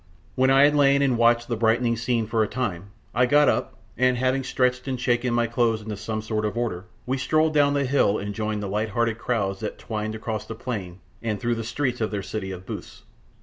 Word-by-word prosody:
When 130 +1 +3
I 135 +1 +6
had 145 +1 +5
lain 140 -1 +4
and 130 -3 +2
watched 120 0 +3
the 120 - -1
brightening 115 +1 +2
scene 115 0 0
for 110 +1 0
a 110 - +2
time, 100 -6 -3 0.2
I 125 +2 +3
got 145 +3 +5
up, - - 0 0.2
and 130 +1 +2
having 130 +2 +1
stretched 125 0 0
and 130 -2 -2
shaken 120 0 +1
my 120 0 +2
clothes 115 -1 +1
into 105 0 -5
some 110 +1 -4
sort 110 -1 -2
of 105 +2 -2
order, 105 -6 -2 0.2
we 130 +2 -1
strolled 155 +4 +2
down 145 -1 +3
the 140 -1 +1
hill 125 -6 +2
and 100 +1 -4
joined 105 -1 -2
the - - -3
light 105 +3 -1
hearted 115 +1 0
crowds 100 -6 -1
that 110 - -5
twined 110 -1 -4
across 110 -1 -4
the 110 - -6
plain 100 -7 -5 0.2
and 110 -3 -2
through 120 0 0
the 115 -1 -3
streets 125 +1 -2
of 110 - +1
their 100 -2 -3
city 100 -1 -4
of 95 -1 -7
booths. - - -8
115 Hz, 230 wpm, -24 LUFS, 110-125 Hz, 0.2 s, I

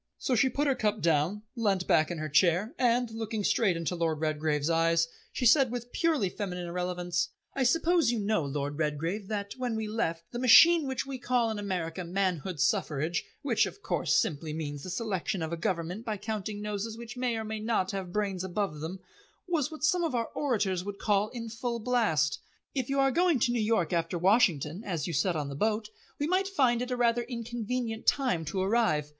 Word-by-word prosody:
So 260 - -1
she 255 +3 +4
put 285 +4 -1
her 275 - +3
cup 215 -3 0
down, 165 +6 +1
leant 200 -6 +1
back 155 -1 +3
in 175 - -4
her 155 0 -3
chair, 180 - +3
and, 245 -1 +2
looking 220 -1 -3
straight 195 -4 +2
into 165 +1 -2
Lord 165 -3 -1
Redgrave's 155 -1 0
eyes, 165 0 +3 0.2
she 250 - -2
said 260 +2 +6
with 245 0 -5
purely 315 - +1
feminine 180 -2 -4
irrelevance: 180 0 -2 0.3
"I 275 - -1
suppose 330 +2 +3
you 240 - -1
know, 210 -4 +1
Lord 145 +1 -3
Redgrave, 165 +7 -2
that, 200 -1 -3
when 250 -3 -2
we 220 -1 -2
left, 170 -7 -2
the 240 - -4
machine 315 +5 +7
which 265 0 -2
we 270 -1 -6
call 245 -2 +1
in 215 - -4
America 180 -3 -3
Manhood 180 -2 -1
Suffrage 155 +5 0 0.2
which, 235 -6 +2
of 410 - -11
course, - - 0
simply 155 -1 -2
means 145 -2 -4
the 185 - -7
selection 190 -2 -2
of 160 +1 -3
a - - +1
government 170 +4 -2
by 215 -3 -3
counting 210 0 -4
noses 210 +2 -3
which 235 +1 -8
may 250 -2 -1
or 220 - -3
may 220 0 -4
not 215 -4 0
have 190 -2 -5
brains 195 -2 -1
above 190 -4 -2
them 175 +5 -6 0.5
was 325 -7 0
what 315 -1 -9
some 345 +2 +3
of 320 -6 -1
our 230 -1 -1
orators 205 -10 0
would 200 0 -6
call 205 0 +1
in 230 -1 -6
full 235 +1 -3
blast. 215 - +1 0.3
If 260 -3 -2
you 275 0 +1
are 270 0 +4
going 345 +1 +3
to 240 - +3
New 240 -2 0
York 210 -7 +1
after 165 +1 0
Washington, 180 - +2
as 170 -9 -3
you 170 - -3
said 180 -1 +1
on 150 -2 -2
the 140 - -6
boat, 215 +5 0 0.3
we 290 - -1
might 370 +4 +1
find 255 -11 +2
it 250 - -3
a 250 - -1
rather 240 0 +2
inconvenient 235 -1 -4
time 250 - +2
to 170 +6 -3
arrive. 195 -8 +2
210 Hz, 210 wpm, -29 LUFS, 170-240 Hz, 0.5 s, machine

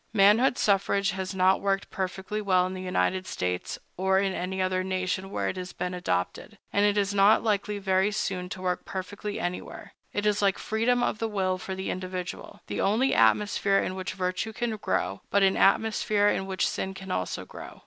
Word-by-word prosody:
Manhood 220 +5 +5
suffrage 200 -1 +2
has 190 +1 -4
not 190 0 +3
worked 195 0 -1
perfectly 190 +2 -3
well 185 -3 +3
in 185 - -4
the 185 - -6
United 185 0 0
States, 90 0 -3 0.2
or 190 +1 +2
in 195 0 +1
any 190 +1 -3
other 185 0 +1
nation 185 0 -2
where - - -2
it - - -3
has 180 0 -6
been 180 - -3
adopted, 90 - -2 0.2
and 200 - +3
it 205 0 +3
is 200 0 +1
not 205 +2 +5
likely 210 -1 0
very 190 0 +2
soon 185 -3 -2
to 185 -1 -7
work 180 -1 -1
perfectly 200 +2 -5
anywhere. 175 +1 -5 0.2
It 205 - -2
is 210 -1 +2
like 195 -2 +2
freedom 245 +3 +1
of - - -1
the 225 - -1
will 185 -3 0
for 190 +1 -5
the 190 0 -3
individual—the 185 -1 -5
only 225 +7 +2
atmosphere 195 - +3
in 185 - 0
which 185 0 -4
virtue 185 +4 -2
can 230 0 -2
grow, 100 - -1
but 200 0 +3
an 190 0 +4
atmosphere 210 0 +3
in 190 - -1
which 190 -1 0
sin 190 0 -3
can 190 -1 -7
also 90 - -2
grow. - - -10
190 Hz, 195 wpm, -27 LUFS, 185-205 Hz, 0.2 s, Manhood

